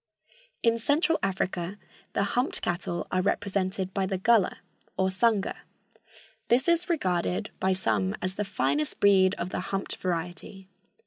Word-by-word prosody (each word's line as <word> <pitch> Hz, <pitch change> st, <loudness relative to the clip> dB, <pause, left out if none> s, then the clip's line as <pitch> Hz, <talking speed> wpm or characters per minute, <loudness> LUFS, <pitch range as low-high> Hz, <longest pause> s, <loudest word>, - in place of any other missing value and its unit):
In 230 Hz, 0 st, +3 dB
Central 320 Hz, +7 st, +2 dB
Africa 190 Hz, -1 st, -2 dB, 0.4 s
the -, -, +1 dB
humped 265 Hz, +10 st, 0 dB
cattle 175 Hz, 0 st, -2 dB
are 185 Hz, -, +2 dB
represented 190 Hz, -1 st, -1 dB
by 195 Hz, -1 st, 0 dB
the 190 Hz, -, -1 dB
Galla, 220 Hz, +1 st, +3 dB, 0.4 s
or 190 Hz, 0 st, +2 dB
Sanga. 210 Hz, 0 st, +1 dB, 0.9 s
This 245 Hz, +5 st, +3 dB
is 340 Hz, +1 st, +2 dB
regarded 185 Hz, -, 0 dB
by 190 Hz, 0 st, +2 dB
some 190 Hz, +1 st, 0 dB
as 185 Hz, 0 st, -2 dB
the 210 Hz, -, -2 dB
finest 145 Hz, -6 st, -1 dB
breed 195 Hz, -1 st, +5 dB
of 175 Hz, +2 st, -4 dB
the -, -, -2 dB
humped 195 Hz, 0 st, -3 dB
variety. 180 Hz, +2 st, -4 dB
190 Hz, 140 wpm, -28 LUFS, 185-215 Hz, 0.9 s, breed